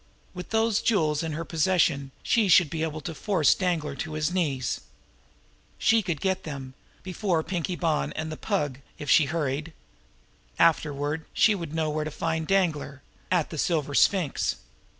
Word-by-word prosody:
With 180 0 -8
those 225 -1 +2
jewels 155 -9 +2
in 165 -2 -3
her 165 +2 -4
possession 160 -5 +1
she 225 -4 +2
should 175 -4 +5
be 160 - -3
able 155 -1 -2
to 165 +3 -5
force 165 -4 +3
Danglar 165 -6 -1
to 155 - -5
his 155 +2 -1
knees. 140 -9 -1 1.0
She 225 0 +3
could 175 -7 -3
get 190 -1 0
them 135 -4 -7 0.3
before 185 -3 -1
Pinkie 180 0 -2
Bonn 165 -3 0
and 155 0 -4
the - - -4
Pug 145 -3 -2 0.2
if 145 - -2
she 155 - +6
hurried. 150 +1 -2 0.8
Afterward 150 -1 +1
she 220 - +5
would 170 -6 -5
know 160 -1 0
where 155 0 -1
to 155 - -4
find 160 +1 -2
Danglar 155 -7 0 0.3
at 175 -4 +1
the 160 - -5
Silver 150 -4 0
Sphinx. 175 -1 +2
160 Hz, 165 wpm, -26 LUFS, 150-180 Hz, 1.0 s, she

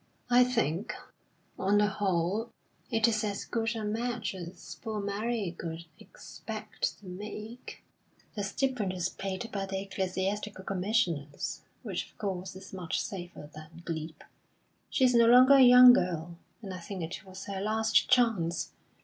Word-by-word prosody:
"I 245 +1 +7
think, 230 -7 -1 0.6
on 200 +2 +3
the 210 - +5
whole, 195 +2 0 0.4
it 225 -1 +3
is 220 -1 +1
as 205 -2 -2
good 230 0 -1
a 220 - -3
match 225 0 -2
as 175 -1 -9
poor 220 -2 -3
Mary 205 -1 -2
could 165 0 -6
expect - - -6
to 210 - -18
make. 210 +5 -8 0.5
The 205 - -3
stipend 210 -1 -1
is 180 -1 -1
paid 195 +4 -4
by 195 -1 -3
the 190 0 -2
Ecclesiastical 195 +1 -3
Commissioners, 180 -7 -1 0.2
which, - - -3
of - - -29
course, 190 -2 -4
is 190 +1 -11
much 180 -4 -2
safer 175 -5 -6
than 155 +2 -12
glebe. 160 -1 -5 0.7
She - - +1
is 250 - +4
no 235 -1 +6
longer 250 +3 +8
a 275 - +8
young 250 0 +10
girl, 170 -4 -1 0.3
and 195 -2 -5
I 185 - -6
think 185 +1 -6
it 165 - -6
was 190 0 -10
her 195 -1 -4
last 220 +1 +2
chance. 225 -10 +2
200 Hz, 155 wpm, -30 LUFS, 180-225 Hz, 0.7 s, young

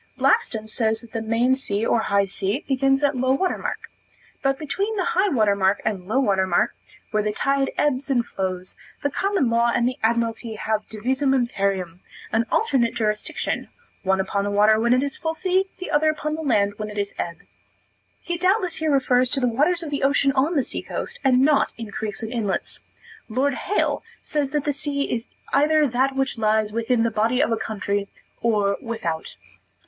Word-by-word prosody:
Blackstone 235 - +2
says 220 0 0
that 235 -2 -14
the 225 - -2
main 230 +4 +2
sea 220 -5 -1
or 235 - +2
high 200 -2 +2
sea 195 +1 -2
begins 270 +1 +2
at 285 -1 +2
low 260 +1 +2
water 365 +7 0
mark. - - -5 0.5
But 270 -1 +1
between 390 +9 -2
the 375 -3 0
high 380 +3 +3
water 215 - +3
mark 195 0 +2
and 195 -4 -2
low 255 +6 +1
water 195 -7 +2
mark, 175 - +2 0.4
where 215 -2 +2
the 210 0 -1
tide 275 +5 +1
ebbs 280 -1 0
and 245 -3 +2
flows, 185 -3 -4 0.3
the 285 - +1
common 390 -4 +1
law 235 +1 +3
and 235 0 +2
the 255 +3 -3
Admiralty 230 0 0
have 215 0 -2
divisum 260 +5 0
imperium, 195 -8 -1 0.3
an 225 +2 +1
alternate 265 - +2
jurisdiction, 210 -2 -2 0.3
one 190 0 +1
upon 200 +1 -1
the 205 - -1
water 210 +2 +4
when 235 +1 +2
it 255 +2 +4
is 280 -1 -3
full 320 0 -2
sea; 375 +2 +1
the 370 - -6
other 305 +1 +3
upon 305 0 -2
the 320 - -3
land 205 -9 +2
when 215 0 -4
it 210 - -9
is 200 0 -2
ebb. 170 -1 -3 0.8
He 345 -1 -3
doubtless 370 +1 +2
here 315 0 0
refers 255 -2 +3
to 280 - 0
the 250 - +2
waters 305 +9 +1
of 305 - -6
the 280 - -2
ocean 275 0 +3
on 275 +6 +1
the 275 - +3
sea - - -3
coast, - - -5
and 255 -2 +4
not 290 +1 +3
in 225 -3 -7
creeks 210 +1 -5
and 225 +2 -4
inlets. 210 -5 -2 0.5
Lord 265 +5 +1
Hale 410 +9 0 0.2
says 290 -3 -1
that 295 0 -1
the 290 - 0
sea 280 0 -1
is 230 0 -3 0.3
either 305 +2 +4
that 265 +1 +1
which 270 -3 -1
lies 215 -1 +1
within 230 +1 +1
the 230 - +1
body 225 +4 +1
of 250 - +2
a - - +3
country 200 -2 -2 0.3
or 205 -4 +2
without. 220 - -4
240 Hz, 200 wpm, -23 LUFS, 215-280 Hz, 0.8 s, water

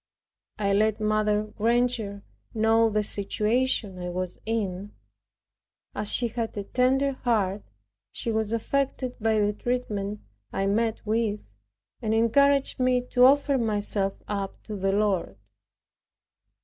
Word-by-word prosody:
I 200 -1 +1
let 215 +1 +2
Mrs. 215 0 0
Granger 225 -3 0 0.3
know 225 +1 +4
the 210 0 0
situation 210 0 0
I 180 0 -4
was 180 0 -4
in. 205 -3 -2 1.0
As 210 0 -1
she 240 -1 +2
had 225 -1 -4
a 200 - -2
tender 260 +5 +2
heart, 210 -7 0 0.5
she 230 - -3
was 220 -1 -1
affected 255 +2 -1
by 220 0 +2
the 210 0 +2
treatment 210 -3 -3 0.3
I 195 - -1
met 220 +3 0
with, 215 -1 0 0.6
and 220 -1 0
encouraged 275 +6 +3
me 255 -1 +3
to 250 0 +6
offer 280 0 +4
myself 205 -3 -1
up 200 -2 -4
to 215 - -6
the 195 0 0
Lord. 195 - 0
215 Hz, 125 wpm, -26 LUFS, 205-240 Hz, 1.0 s, to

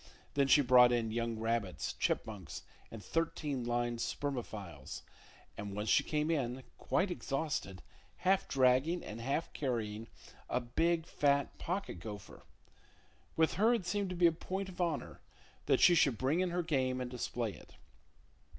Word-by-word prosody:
Then 140 -1 +3
she 140 +2 +7
brought 125 -1 +7
in 115 -2 0
young 115 0 -1
rabbits, 115 -4 -1
chipmunks 100 -5 -3 0.3
and 105 -4 -9
thirteen 150 - -1
lined 120 0 -1
spermophiles, 110 - -4 0.5
and 100 -1 -6
once 105 +1 -2
she - - +5
came 150 +2 0
in, 130 -4 -1 0.2
quite 185 0 +1
exhausted, 135 - -3 0.4
half 190 +1 +3
dragging 135 +6 +3
and 110 +2 -7
half 140 +7 -2
carrying 115 -5 -2 0.4
a - - +1
big, 160 +7 0
fat 140 -4 +1
pocket 180 - -3
gopher. 105 +1 -9 0.9
With 160 0 +3
her 230 +3 +5
it 195 - -3
seemed 195 +2 -1
to 180 - -4
be 175 0 +3
a 170 - +7
point 190 +4 -4
of 180 -1 -6
honor 165 -4 -2 0.5
that - - +4
she 175 - +8
should 140 -8 +4
bring 135 +8 +1
in 185 -1 +1
her 175 0 -1
game 130 -5 0
and 125 -1 -4
display 120 -3 -3
it. - - -15
130 Hz, 155 wpm, -34 LUFS, 115-165 Hz, 0.9 s, she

